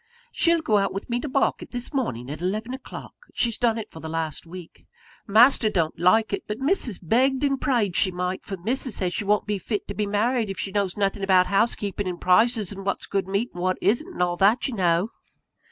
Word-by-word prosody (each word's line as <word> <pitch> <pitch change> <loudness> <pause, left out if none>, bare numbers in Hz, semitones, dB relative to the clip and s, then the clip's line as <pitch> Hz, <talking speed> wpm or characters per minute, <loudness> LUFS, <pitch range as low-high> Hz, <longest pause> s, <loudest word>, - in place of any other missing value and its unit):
She'll 335 -1 +3
go 215 -7 +3
out 195 -1 -1
with 195 - -6
me 240 - +1
to 300 - -4
market, 275 +1 0
this 245 +4 -5
morning, 130 - -2
at 155 - -6
eleven 215 +7 -2
o'clock. 265 0 -9 0.2
She's 230 -2 0
done 230 -2 +2
it 220 - -6
for 160 - -10
the 160 - -7
last 160 0 -4
week. 175 0 -12 0.4
Master 225 +2 +5
don't 165 -6 -1
like 210 +5 +3
it; 200 - -3
but 210 - -3
Missus 270 - +1
begged 260 - +1
and 275 -2 +1
prayed 230 - +1
she 190 - +3
might; 180 +1 -3
for 195 - -6
Missus 235 +5 -1
says 180 -2 -1
she 210 - -2
won't 210 +1 +2
be 205 -1 -2
fit 210 +1 -4
to - - -3
be 210 0 -2
married, 220 +2 0
if 195 - -5
she 195 - -4
knows 200 -1 -1
nothing 200 0 0
about 190 -2 +4
housekeeping, 200 0 0
and 180 -1 -4
prices, 215 +2 +3
and 195 -1 -7
what's 195 - -2
good 195 -2 -2
meat, 200 +5 -1
and 175 - -7
what 185 0 0
isn't, 240 +9 +1
and 180 - 0
all 175 0 -1
that, 210 +6 +3
you 265 - -5
know." 180 +1 +1
205 Hz, 230 wpm, -24 LUFS, 185-235 Hz, 0.4 s, Master